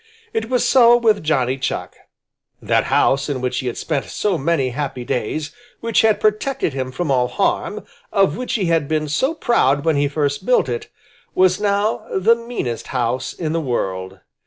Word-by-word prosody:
It 225 0 -2
was 250 -1 +1
so 240 -2 +6
with 220 -3 +2
Johnny 135 -4 0
Chuck. 130 - -3 0.6
That - - +1
house 135 +2 +2
in 140 -3 -2
which 125 0 -2
he 130 - -4
had 120 - -3
spent 145 -4 -2
so 205 -3 -1
many 145 -3 0
happy 130 -2 -4
days, 145 +7 -2 0.3
which 230 -2 +2
had 220 -2 +3
protected 215 - 0
him 130 -1 -3
from 155 +2 -2
all 125 -2 +2
harm, 200 +8 -1 0.3
of 195 -2 +2
which 250 0 -4
he 205 -5 0
had 165 -4 +1
been 155 0 -1
so 265 - 0
proud 140 - +2
when 160 -3 +2
he 145 0 +2
first 145 -1 -1
built - - +3
it, 445 -2 -4 0.5
was 185 +1 +3
now 205 +1 0
the 205 +5 +5
meanest 230 - -4
house 125 0 -1
in 160 -3 -4
the 165 - 0
world. 95 -8 -3
155 Hz, 180 wpm, -20 LUFS, 130-215 Hz, 0.6 s, so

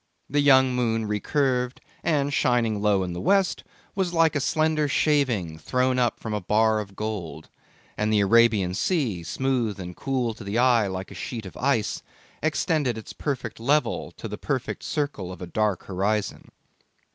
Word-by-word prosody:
The 145 - 0
young 130 -2 +5
moon 115 -3 0
recurved, 125 +4 0 0.2
and 145 -3 +1
shining 115 -6 +1
low 105 -2 +2
in 90 -1 -4
the 85 - -5
west, 195 0 +2 0.3
was 185 -3 -1
like 165 -2 +4
a - - +2
slender 155 +1 +1
shaving 125 - +1
thrown 125 +8 +1
up 120 -2 +1
from 110 - -5
a 105 - -1
bar 110 +3 +2
of 100 -2 -7
gold, 95 -8 -5 0.5
and 105 0 +1
the 105 -1 +4
Arabian 105 -3 +4
Sea, 120 - 0
smooth 120 +1 -1
and 90 -1 -7
cool 125 -4 -1
to 110 - -11
the 100 +3 -2
eye 120 -4 +4
like 95 0 -5
a - - -8
sheet 115 -4 -6
of 95 - -9
ice, 130 -6 0 0.4
extended 155 -5 0
its 110 - -8
perfect 130 -7 -4
level 145 +6 +1
to - - -7
the - - -7
perfect - - -3
circle 145 -12 -3
of 90 - -9
a 90 - -5
dark 105 +1 -1
horizon. 100 +3 -2
115 Hz, 170 wpm, -25 LUFS, 105-140 Hz, 0.5 s, young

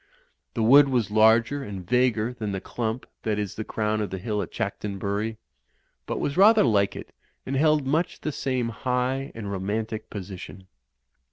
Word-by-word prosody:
The 115 - 0
wood 140 +5 +7
was 120 -5 0
larger 110 +6 +4
and 95 -6 -7
vaguer 125 -1 +2
than 110 -4 -4
the 95 - -2
clump 115 +4 -4 0.2
that 110 -2 -1
is 105 -3 -3
the 110 - -4
crown 110 0 -1
of 105 - -2
the 95 - -4
hill 105 +2 -2
at - - -5
Chanctonbury, 105 0 -3 0.7
but - - -2
was 140 - -2
rather 215 +3 +7
like 100 -5 +2
it - - -9 0.3
and 135 - -3
held 150 0 +3
much 155 +6 0
the 155 - -2
same 130 -4 -1
high 125 +4 -1
and 105 -3 -5
ro 95 - -3
mantic 110 +3 -3
position. 95 -1 -8
110 Hz, 175 wpm, -25 LUFS, 105-130 Hz, 0.7 s, wood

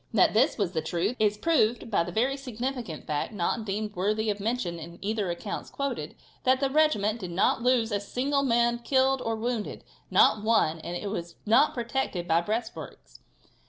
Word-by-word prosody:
That - - +5
this - - +3
was 200 -6 0
the 160 -3 -1
truth 175 +8 -1
is 210 -1 +2
proved 235 -5 +1
by 185 - +3
the 175 - -6
very 250 +8 +1
significant 250 - -5
fact, 150 +8 -2
not 210 +4 -1
deemed 210 +1 -3
worthy 210 +4 0
of 205 - -5
mention 210 -5 -2
in 170 +2 -9
either 210 -2 -2
of 170 - -2
the - - -18
accounts 205 - -5
quoted, 280 0 -4 0.3
that 260 0 +3
the 275 -1 0
regiment 240 -8 +2
did 185 -4 -6
not 185 +7 +1
lose 240 -2 +2
a 205 - +1
single 270 +7 -1
man 235 -2 +2
killed 265 +1 +2
or 225 -1 -1
wounded; 230 -1 -3 0.3
not 210 - +4
one, 190 -8 +2
and 175 +2 -5
it 200 +2 -4
was 170 -4 -5
not 235 +8 +4
protected 235 -7 -2
by 165 0 +3
breastworks. 220 +5 -5
220 Hz, 195 wpm, -27 LUFS, 190-250 Hz, 0.3 s, That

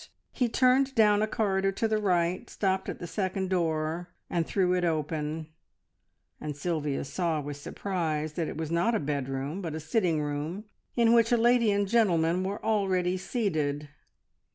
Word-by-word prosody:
He 245 -3 0
turned 260 +3 +3
down 210 -2 +5
a 215 - +2
corridor 195 -3 +1
to 225 - 0
the 215 -1 +1
right, 180 -2 +1
stopped 190 -1 -1
at - - -4
the - - -7
second 190 0 -2
door, 165 -1 -1 0.2
and 170 -2 0
threw 185 -2 +2
it 180 -1 +1
open, 155 -1 -2 0.9
and 150 -1 -5
Sylvia 150 -3 -1
saw 165 +1 -1
with 145 0 -5
surprise 155 -2 -3
that 165 0 -2
it - - -6
was 160 -1 -4
not 195 +8 +2
a - - +1
bedroom, 140 +3 -3
but 165 -4 -4
a - - -3
sitting 165 0 +1
room, 150 +6 -3 0.3
in 235 -1 +4
which 230 0 +4
a 240 - +5
lady 235 -1 +4
and 200 0 +2
a - - -9
gentleman 180 -6 +3
were 195 +2 -4
already 190 -4 +1
seated. 155 - -2
180 Hz, 175 wpm, -28 LUFS, 155-205 Hz, 0.9 s, down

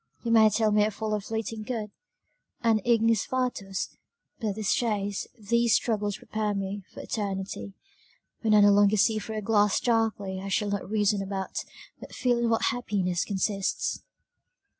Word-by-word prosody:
you 230 - -1
may 220 -1 +7
tell 215 +1 +2
me 210 0 +4
I 210 - +2
follow 215 0 -2
a - - -6
fleeting 220 +1 -4
good, 215 -2 -4 0.7
an 225 -3 +3
ignis 230 -2 +3
fatuus; 245 -7 -3 0.4
but 215 -4 -1
this 215 -2 0
chase, 205 -4 -1
these 235 +2 +2
struggles 210 -3 0
prepare 215 -1 -2
me 195 +1 -3
for - - -9
eternity 195 -2 -4 0.6
when 220 -2 +3
I 210 - +7
no 205 0 +7
longer 205 +1 +4
see 215 +2 +3
through 220 +1 -6
a - - -2
glass 210 -1 +3
darkly 215 -5 0
I 195 - -6
shall 205 +1 0
not 200 -1 -3
reason 210 -1 +2
about, 195 -1 -4 0.4
but - - -11
feel 245 -2 +1
in 235 -1 +1
what 225 - +1
happiness 195 -8 -1
consists." 195 0 -1
210 Hz, 165 wpm, -27 LUFS, 200-225 Hz, 0.7 s, may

